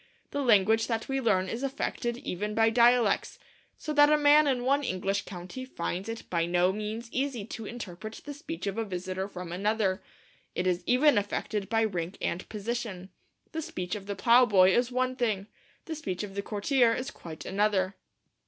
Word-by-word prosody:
The 285 - -1
language 220 -2 +4
that 225 -2 -2
we 270 0 -1
learn 190 -6 +2
is 230 +5 -4
affected 260 -3 -2
even 210 -4 -4
by 225 0 +4
dialects, 235 -2 +3 0.4
so 305 - -4
that 290 0 +6
a 300 - +6
man 295 +1 +6
in 250 -3 0
one 280 +2 +3
English 195 -2 -1
county 185 +7 -7
finds 190 -4 -4
it 225 0 -5
by 170 -1 0
no 180 +2 +2
means 215 +3 -4
easy 260 -5 -2
to 225 -1 -7
interpret 215 -2 -7
the 290 - -5
speech 325 0 -6
of 200 +2 -2
a - - +1
visitor 185 -1 -4
from 180 -3 -8
another. 200 +1 0 0.5
It 180 - -1
is 180 -1 +1
even 255 -1 +5
affected 205 0 -3
by 225 -1 +2
rank 180 -4 -2
and 175 - -3
position; 210 -3 -4 0.4
the 320 - -3
speech 300 - -5
of 200 -2 -5
the 200 - -3
plough 240 +4 +5
boy 190 -3 +5
is 245 +1 +2
one 255 +1 0
thing, 215 -6 0 0.4
the 325 - -4
speech 200 - -4
of 200 -2 -7
the 200 - -2
courtier 230 +3 +2
is 255 +2 -4
quite 160 -2 -10
another. 195 -1 +1
215 Hz, 190 wpm, -29 LUFS, 190-250 Hz, 0.5 s, that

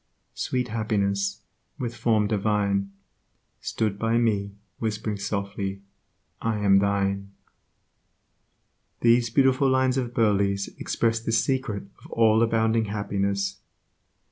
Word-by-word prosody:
sweet 125 -1 -2
Happiness, 100 -2 -1 0.4
with 120 -4 -4
form 110 -2 +2
divine, 100 -1 0 0.7
Stood 105 -3 -2
by 115 +1 +1
me, 100 -4 0 0.2
whispering 110 -1 -2
softly, 100 -1 -3 0.6
'I 115 -1 0
am 100 -1 +4
thine'. 100 0 0 1.7
These 120 0 +4
beautiful 135 +2 +3
lines 130 0 +2
of 120 -2 -2
Burleigh's 100 -3 +2
express 115 0 0
the 115 - -3
secret 120 -4 0 0.2
of - - -13
all 110 -1 +4
abounding 115 -1 +2
happiness. 100 -1 -1
105 Hz, 105 wpm, -25 LUFS, 100-115 Hz, 1.7 s, am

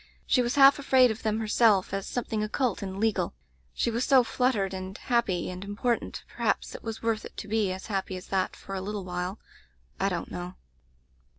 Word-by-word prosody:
She 250 - +3
was 240 0 -1
half 275 0 +7
afraid 260 -3 +5
of 220 - -6
them 215 0 0
herself, 215 -3 +3
as 195 -1 -2
some 245 - -2
thing 220 -2 -2
occult 225 +2 -1
and 190 -1 -5
legal. 220 - 0 0.4
She 235 - 0
was 235 +2 0
so 265 -2 +6
fluttered 225 -4 0
and 190 +1 -6
happy 225 -9 0
and 180 +1 -7
important 225 +4 -2
— - - -18
^perhaps - - 0
it - - -8
was 225 -1 -6
worth 225 -1 0
it - - -11
to 210 - -6
be 210 -2 +1
as 185 +1 -6
happy 195 -3 -2
as 185 - -9
that 190 -1 0
for 195 - -9
a 190 - -2
litde 200 0 -4
while. 180 +2 -3 0.6
I 195 - +2
don't 175 -3 -4
know. 180 +1 -6
210 Hz, 210 wpm, -28 LUFS, 190-235 Hz, 0.6 s, half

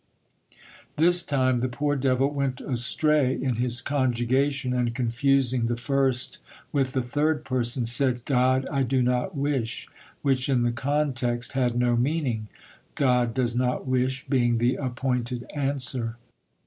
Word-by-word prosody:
This 175 +3 +4
time 130 -5 +1
the 125 +2 -1
poor 145 +4 -1
devil 135 +1 +1
went 140 -3 -2
astray 135 +2 +1
in 130 -4 -2
his 125 0 0
conjugation, 130 0 0
and 120 -2 0
confusing 125 0 +1
the 120 - 0
first 130 0 0 0.3
with 135 -3 0
the 130 - 0
third 150 +4 0
person, 125 -1 0
said, 125 0 +2
"God, 130 0 +2
I 140 -2 0
do 130 0 +1
not 125 +7 -1
wish," 135 -5 -2 0.4
which 135 -1 +1
in 125 -3 +2
the 120 - +1
context 125 -2 -1
had 125 -2 0
no 120 -1 +2
meaning. 125 -4 -1 0.5
"God 125 -4 +2
does 120 -2 0
not 125 +1 0
wish," 130 0 0
being 120 -4 +2
the 120 +2 +2
appointed 125 -2 -2
answer. 130 -5 -2
130 Hz, 140 wpm, -25 LUFS, 120-140 Hz, 0.5 s, This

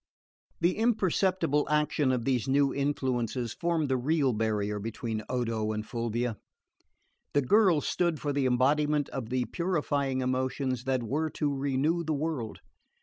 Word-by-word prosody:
The 175 +2 +2
imperceptible 190 - +2
action 150 -2 +2
of 125 -3 -1
these 130 -2 +1
new 140 +1 +3
influences 130 -4 -1
formed 170 -3 0
the 130 -1 +1
real 140 0 +1
barrier 105 -1 -1
between 110 +1 -4
Odo 115 -4 -1
and 105 0 -4
Fulvia. 115 -1 -2 1.0
The 145 - +4
girl 185 - +4
stood 170 -2 0
for 145 -1 -2
the 140 -2 +1
embodiment 145 +4 +2
of 125 -5 -5
the 125 -1 0
purifying 145 -7 -1
emotions 130 0 -1
that 130 -2 0
were 150 +7 -1
to 145 -1 +1
renew 140 +5 0
the 155 -1 -1
world. 140 -7 -3
135 Hz, 145 wpm, -29 LUFS, 120-150 Hz, 1.0 s, The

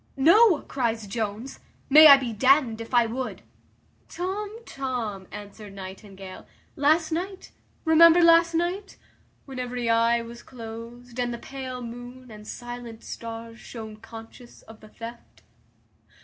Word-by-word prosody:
"No," 340 +5 +6
cries 230 -4 -2
Jones, 220 +4 -5 0.3
"may 310 +3 +9
I 280 -2 +10
be 250 -4 -4
d 220 +5 -2
n'd 230 -5 -7
if 230 - -9
I 240 -2 +4
would." 230 -4 -5 0.7
"Tom, 400 +4 -4
Tom," 235 -8 -4
answered 205 0 -10
Nightingale, 190 0 -10 0.3
"last 315 +2 +2
night; 370 +4 -4 0.3
remember 335 +2 +7
last 335 0 +5
night 360 +4 -2 0.5
When 265 -2 -8
every 245 -2 -2
eye 230 +1 +3
was 235 +1 -10
closed, 235 +1 -10
and 245 -1 0
the 235 - -4
pale 255 0 -7
moon, 245 +1 -10
And 210 0 -12
silent 240 -2 -8
stars, 230 0 -8
shone 220 -2 -9
conscious 225 +2 -13
of 225 -1 -14
the 215 - -15
theft." 235 +2 -11
240 Hz, 135 wpm, -25 LUFS, 225-275 Hz, 0.7 s, I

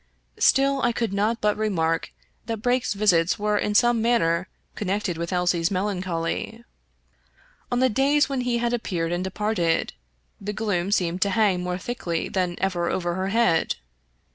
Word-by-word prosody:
Still 275 0 +3
I 240 - +2
could 230 -4 -2
not 215 +3 0
but 210 0 +2
remark 165 -7 -1 0.4
that 225 -1 -2
Brake's 245 -3 +1
visits 180 -5 +3
were 210 0 0
in 210 - -1
some 240 +1 +4
manner 185 -7 +2 0.3
connected 195 -2 -2
with 170 +2 -4
Elsie's 180 -2 +1
melancholy. 185 +2 -2 1.1
On 245 +1 +1
the 260 - +5
days 275 +5 +3
when 270 -2 -2
he 245 -1 0
had 235 0 0
appeared 175 -8 -2
and 175 +1 -1
departed, 190 -3 0 0.5
the 205 +1 -4
gloom 200 -4 -1
seemed 180 -2 0
to 200 - +3
hang 200 -3 +2
more 180 0 -2
thickly 180 -6 -3
than 180 -2 -1
ever 180 -2 -1
over 175 -1 -1
her 185 +2 -2
head. 195 -6 +2
200 Hz, 160 wpm, -24 LUFS, 175-230 Hz, 1.1 s, the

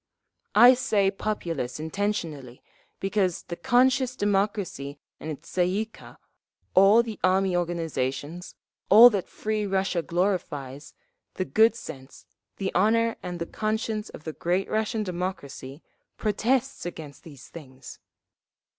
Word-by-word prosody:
"I 240 +4 +9
say 205 -6 +1
'populace' 170 -11 -3
intentionally, 160 - -4 0.4
because 195 -3 0
the 170 - -6
conscious 255 +2 +2
democracy 195 - -1 0.2
and 160 - -7
its 155 +2 -7
Tsay 180 -1 +1
ee 200 +4 -1
kah, 225 - -15 0.6
all 200 +5 +6
the 225 -3 -7
Army 185 0 +2
organisations, 165 -2 -3 0.3
all 230 +5 +10
that 200 -4 -2
free 215 0 -2
Russia 190 -2 0
glorifies, 165 -7 -3 0.4
the 185 - -2
good 225 +3 +4
sense, 135 - -10 0.3
the 195 -1 -3
honour 230 +5 +2
and 180 -1 -5
the 170 - -3
conscience 215 +2 -3
of - - -11
the 160 - -5
great 180 +5 -1
Russian 220 +1 0
democracy, 175 -6 -6 0.3
protests 245 +5 0
against 160 -5 -8
these 145 -5 -13
things…. 135 -5 -12
190 Hz, 125 wpm, -26 LUFS, 165-215 Hz, 0.6 s, all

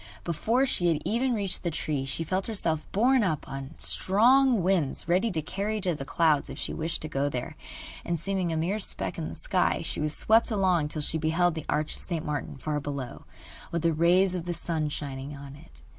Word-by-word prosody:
Before 225 - +1
she 180 -9 +1
had 165 -3 +2
even 245 +2 +1
reached 200 -3 -2
the 175 - -1
tree 150 -4 -2
she 140 +4 -1
felt 185 +4 -2
herself 165 -8 -2
borne 245 +4 +3
up 160 -7 -1
on 135 +2 -7
strong 240 +2 +4
wings 175 -8 +1
ready 185 +6 +2
to 160 -6 -1
carry 200 +6 -2
her 215 - -2
to 180 -2 +1
the 135 -3 -6
clouds 155 -2 +2
if 135 - -7
she - - -3
wished 160 0 -2
to - - -3
go 140 -1 -1
there, 125 -3 -5 0.5
and 170 -1 -2
seeming 185 0 -1
a 160 - -1
mere 180 +7 0
speck 195 - -2
in - - -3
the - - -7
sky, - - 0
she - - -2
was 150 0 -1
swept 225 +1 +4
along 185 -7 +2
till 150 0 -4
she 160 - 0
beheld 165 +2 +2
the 160 -2 -6
Arch 150 0 0
of - - -14
St. 165 -4 -2
Martin 145 -2 -4
far 150 +2 -2
below, 140 -3 -6 0.5
with 170 -1 -2
the 165 -1 +3
rays 180 +4 +3
of 175 -2 -4
the 175 -1 -2
sun 160 -3 -2
shining 140 -1 -5
on 140 0 -10
it. 65 - -16
165 Hz, 220 wpm, -27 LUFS, 150-195 Hz, 0.5 s, strong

